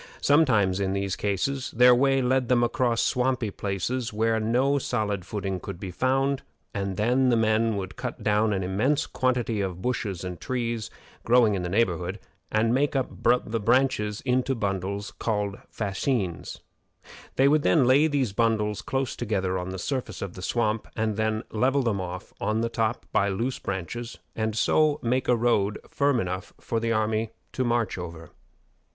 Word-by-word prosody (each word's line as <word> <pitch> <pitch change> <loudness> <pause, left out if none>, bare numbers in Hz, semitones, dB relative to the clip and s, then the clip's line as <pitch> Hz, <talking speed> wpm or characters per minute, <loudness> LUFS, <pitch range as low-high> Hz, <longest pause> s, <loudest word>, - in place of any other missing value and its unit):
Sometimes, 110 -11 +3
in 95 -1 0
these 100 -1 -1
cases, 125 +7 -1
their 125 +1 +6
way 135 +1 +3
led 125 0 +1
them 120 -1 +4
across 120 -1 +1
swampy 125 -4 0
places 105 +6 -2
where 110 +1 +1
no 125 +6 +2
solid 105 -8 -2
footing 95 -3 -3
could 85 - -7
be 95 - -5
found, 135 +6 +1 0.3
and 100 -2 -3
then 125 +4 +3
the 120 - +3
men 110 0 +2
would 95 -1 -5
cut - - -5
down 105 +1 +2
an 95 -2 0
immense 125 +12 +1
quantity 125 -4 0
of 95 -2 -4
bushes 105 -8 -2
and 90 -2 -6
trees 120 -3 -2 0.3
growing 115 -3 +4
in 95 - -1
the 90 - -3
neighborhood, 95 -4 0 0.3
and 115 +2 +2
make 140 +3 +1
up 135 -2 0 0.3
the 115 +1 -2
branches 110 -2 +1
into 130 +1 +1
bundles 100 -1 -2
called 105 -3 -2
fascines. 100 - -2 0.7
They 135 - +4
would 150 +1 +3
lay 140 0 +5
these 135 -8 0
bundles 105 -2 +1
close 135 -1 -2
together 95 -5 -1
on 90 +1 -5
the 95 - -5
surface 130 +6 -3
of 95 -3 -6
the 95 - -9
swamp, 110 +1 0
and 110 -1 0
then 110 +1 0
level 130 +5 +2
them 105 -5 0
off 90 +1 -7
on 110 +1 0
the 115 - 0
top 115 0 -1
by 100 - +2
loose 115 +7 -2
branches, 100 +6 -5 0.2
and 110 -1 -1
so 155 +5 +3
make 125 +2 0
a 125 - +4
road 110 -4 +1
firm 140 -3 +2
enough 95 -1 -4
for 115 - -2
the 115 0 -1
army 110 0 0 0.2
to 130 - -1
march 120 -5 0
over. 85 -2 -8
110 Hz, 170 wpm, -26 LUFS, 100-125 Hz, 0.7 s, their